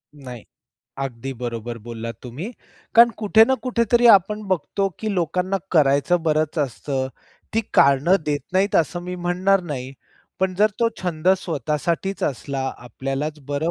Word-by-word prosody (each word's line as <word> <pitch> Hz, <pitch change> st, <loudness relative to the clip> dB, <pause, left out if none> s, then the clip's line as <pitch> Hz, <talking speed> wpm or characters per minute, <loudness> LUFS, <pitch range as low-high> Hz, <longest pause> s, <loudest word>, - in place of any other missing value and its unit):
नाही. 125 Hz, -5 st, -10 dB, 0.6 s
अगदी 135 Hz, -1 st, -4 dB
बरोबर 120 Hz, -1 st, -5 dB
बोललात 115 Hz, +1 st, -7 dB
तुम्ही, 135 Hz, -, -6 dB, 0.4 s
कारण 235 Hz, +1 st, +8 dB
कुठे 220 Hz, +1 st, +5 dB
ना 265 Hz, -, +3 dB
कुठेतरी 240 Hz, -1 st, +2 dB
आपण 210 Hz, +3 st, +1 dB
बघतो, 190 Hz, +2 st, 0 dB
की 215 Hz, -1 st, -2 dB
लोकांना 180 Hz, +2 st, 0 dB, 0.2 s
करायचं 150 Hz, +2 st, +3 dB
बरंच 155 Hz, 0 st, 0 dB
असतं. 135 Hz, -1 st, -2 dB, 0.5 s
ती 225 Hz, -, +3 dB
कारणं 140 Hz, +7 st, +5 dB
देत 145 Hz, -1 st, 0 dB
नाहीत, 190 Hz, +2 st, +2 dB
असं 175 Hz, +2 st, +1 dB
मी 180 Hz, +1 st, -5 dB
म्हणणार 180 Hz, +2 st, +1 dB
नाही. 135 Hz, -6 st, -5 dB, 0.5 s
पण 190 Hz, -1 st, +1 dB
जर 210 Hz, +3 st, +3 dB
तो 230 Hz, -, +4 dB
छंद 170 Hz, -1 st, -1 dB
स्वतःसाठीच 165 Hz, +3 st, -2 dB
असला, 135 Hz, +1 st, -2 dB, 0.2 s
आपल्यालाच 135 Hz, +5 st, -4 dB
बरं 145 Hz, +3 st, -1 dB
155 Hz, 140 wpm, -22 LUFS, 135-190 Hz, 0.6 s, कारण